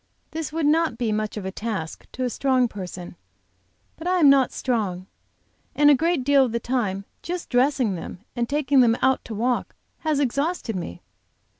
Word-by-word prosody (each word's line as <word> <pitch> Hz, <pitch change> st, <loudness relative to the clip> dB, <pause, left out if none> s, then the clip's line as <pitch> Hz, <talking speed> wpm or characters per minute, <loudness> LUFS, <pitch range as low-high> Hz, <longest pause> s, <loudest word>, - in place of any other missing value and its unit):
This 315 Hz, -2 st, -4 dB
would 320 Hz, -1 st, -1 dB
not 310 Hz, -4 st, +2 dB
be 235 Hz, -3 st, -1 dB
much 215 Hz, 0 st, -2 dB
of 200 Hz, -, -5 dB
a 190 Hz, -, -3 dB
task 200 Hz, -6 st, -5 dB
to 255 Hz, -, -3 dB
a 250 Hz, -, +1 dB
strong 260 Hz, -1 st, +2 dB
person, 180 Hz, -4 st, -8 dB, 0.8 s
but 330 Hz, -, -6 dB
I 365 Hz, 0 st, +2 dB
am 295 Hz, -5 st, +7 dB
not 270 Hz, -2 st, +4 dB
strong, 205 Hz, -8 st, -2 dB, 0.7 s
and 295 Hz, 0 st, +6 dB
a -, -, +8 dB
great 330 Hz, -1 st, +1 dB
deal 280 Hz, 0 st, +5 dB
of 250 Hz, -, -1 dB
the 235 Hz, -, 0 dB
time 210 Hz, -6 st, -2 dB, 0.2 s
just 355 Hz, 0 st, -5 dB
dressing 250 Hz, -3 st, +2 dB
them 175 Hz, +1 st, -7 dB
and 235 Hz, -1 st, -1 dB
taking 285 Hz, -1 st, +2 dB
them 235 Hz, -2 st, +5 dB
out 265 Hz, 0 st, +3 dB
to 220 Hz, -, -6 dB
walk 245 Hz, +3 st, -1 dB, 0.2 s
has 310 Hz, -3 st, 0 dB
exhausted 280 Hz, -, -1 dB
me. 170 Hz, -, -6 dB
255 Hz, 185 wpm, -24 LUFS, 215-290 Hz, 0.8 s, a